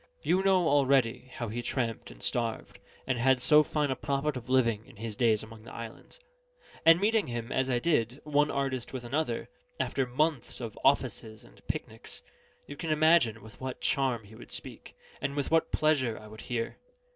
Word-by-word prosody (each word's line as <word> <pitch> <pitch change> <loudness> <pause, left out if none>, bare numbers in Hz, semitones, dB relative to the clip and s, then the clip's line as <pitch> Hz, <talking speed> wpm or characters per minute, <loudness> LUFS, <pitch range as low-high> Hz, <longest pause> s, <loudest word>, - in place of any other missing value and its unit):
You 185 - +3
know 190 -3 +3
already 135 -4 +2
how 120 -3 -4
he 120 +3 -3
tramped 120 -3 -2
and - - -12
starved, 115 -2 -2 0.3
and 130 -2 -1
had 130 +1 +4
so 150 +4 +6
fine 150 -2 0
a - - 0
profit 140 +2 -1
of 125 0 -7
living, 115 -5 +2
in - - -16
his 110 0 -6
days 115 -3 +2
among 110 0 -11
the 110 - -12
islands; 115 - -9 0.6
and 165 +1 +7
meeting 215 +1 +2
him, 120 0 -4
as 130 0 +1
I 125 - +2
did, 125 -3 +1
one 150 0 +2
artist 135 -3 -2
with 130 -2 -4
another, 145 +6 -2 0.3
after 135 -2 0
months 145 +1 0
of 115 -4 -6
offices 110 -1 +1
and - - -18
picnics, - - -6 0.4
you 145 - -8
can 160 +3 -5
imagine 155 -8 +4
with 110 +2 -14
what 130 -1 -4
charm 130 -4 0
he 105 +2 -15
would - - -12
speak, - - -7 0.3
and 140 0 -2
with 145 0 -2
what 165 0 +3
pleasure 140 -7 +2
I 110 - -11
would 110 0 -11
hear. 115 -2 -3
130 Hz, 190 wpm, -30 LUFS, 115-150 Hz, 0.6 s, and